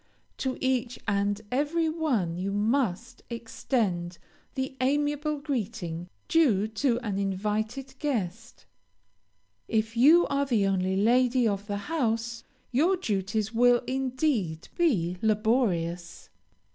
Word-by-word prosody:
To 260 -1 -2
each 255 -2 0
and 200 0 +1
every 300 +5 +1
one 275 - 0
you 190 +3 -2
must 225 +2 0
extend 220 -6 -2 0.4
the 265 0 -3
amiable 295 +2 +1
greeting 215 - -4 0.2
due 225 -11 +3
to 235 +2 +1
an 205 -5 -2
invited 215 +7 -2
guest. 230 - -3 1.0
If 225 +1 0
you 305 +9 +6
are 280 0 0
the 225 -6 +2
only 190 -1 +1
lady 245 +4 +3
of 200 -1 -2
the 205 -1 -2
house, 230 -3 -2 0.3
your 330 +10 +3
duties 210 - -2
will, 245 +1 +4
indeed, 255 - -1
be 185 - +1
laborious. 205 -6 0
230 Hz, 110 wpm, -27 LUFS, 200-265 Hz, 1.0 s, you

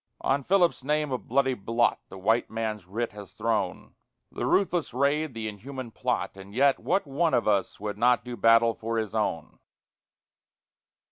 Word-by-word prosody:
On 140 +1 +1
Philip's 175 -2 +2
name 150 +1 0
a 130 - -1
bloody 135 +1 +1
blot 115 +1 +1
The - - -10
white 110 +5 +1
man's 110 -4 -4
writ 115 +5 -3
has 100 -4 -11
thrown, - - -2 0.4
The - - -3
ruthless 175 - +1
raid, 140 +1 +1
the 110 -1 -3
inhuman 120 +4 -7
plot; - - -2
_And 100 +1 -12
yet 135 +1 +4
what 195 - 0
one 155 +4 +1
of 120 - +1
us 100 -2 +1
would 105 0 -5
not 125 0 +3
Do 125 0 -5
battle 115 +1 +5
for 115 +1 -3
his 110 -2 -2
own! 105 -7 -2
115 Hz, 165 wpm, -27 LUFS, 110-140 Hz, 0.4 s, battle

